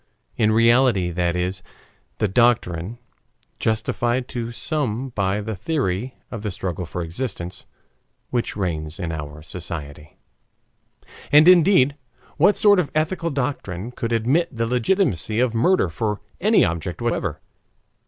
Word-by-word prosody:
In 110 -1 +2
reality 115 -4 +4
that 85 0 0
is 90 +1 -2 0.6
the 105 - +1
doctrine 105 -3 +1 0.6
justified 120 +3 0
to 120 -1 -4
some 130 -2 -1
by 100 -3 -1
the 110 +1 -4
theory 125 - -2 0.2
of 115 - -5
the 105 - -3
struggle 90 -3 -4
for 90 +1 -4
existence 90 -1 -5 0.6
which 120 -4 -1
reigns 80 -5 -3
in 85 -3 -3
our 75 -1 -7
society. 75 -3 -8 1.1
And, 150 +3 +7
indeed, 170 -6 +6 0.4
what 185 +7 +4
sort 205 -3 +5
of 165 - 0
ethical 165 +2 0
doctrine 125 - -3
could 120 -1 -4
admit 130 +10 +2
the 115 -3 -2
legitimacy 120 - +1
of 125 -2 +2
murder 120 - +3
for 105 +6 -2 0.2
any 215 +4 +5
object 85 0 -3
whatever? 120 -1 -2
115 Hz, 130 wpm, -22 LUFS, 90-130 Hz, 1.1 s, And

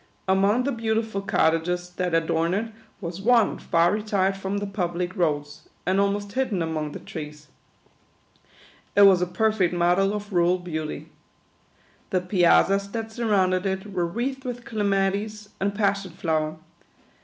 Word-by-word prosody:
Among 200 +6 +3
the 280 - 0
beautiful 220 -3 -1
cottages 175 0 0
that 180 -1 -1
adorn 165 +1 +1
it 220 +2 -3 0.3
was 175 0 -6
one 230 0 +3
far 170 +1 +2
retired 200 -2 0
from 195 +1 -3
the 205 - -2
pub 185 -4 -3
lic 180 +2 -3
roads, 150 -5 -2 0.2
and 185 +2 +2
almost 200 0 -1
hidden 220 -8 0
among 155 -2 -3
the - - -6
trees. 150 -1 -9 1.5
It 205 - +7
was 190 -3 +7
a 180 - +1
perfect 210 -3 +1
model 180 +4 +2
of 205 0 -6
rural 175 +1 +3
beauty. 155 -4 -5 1.0
The 185 - +1
piazzas 190 +2 +3
that 225 -1 -4
surrounded 195 -5 +1
it 190 +1 -4
were 175 -2 0
wreathed 260 +8 -3
with 245 -2 -6
Clematis 205 0 -1
and 200 +1 -1
Pas 200 -1 +1
sion 185 -4 -10
Flower. 155 -2 -1
195 Hz, 150 wpm, -25 LUFS, 175-210 Hz, 1.5 s, It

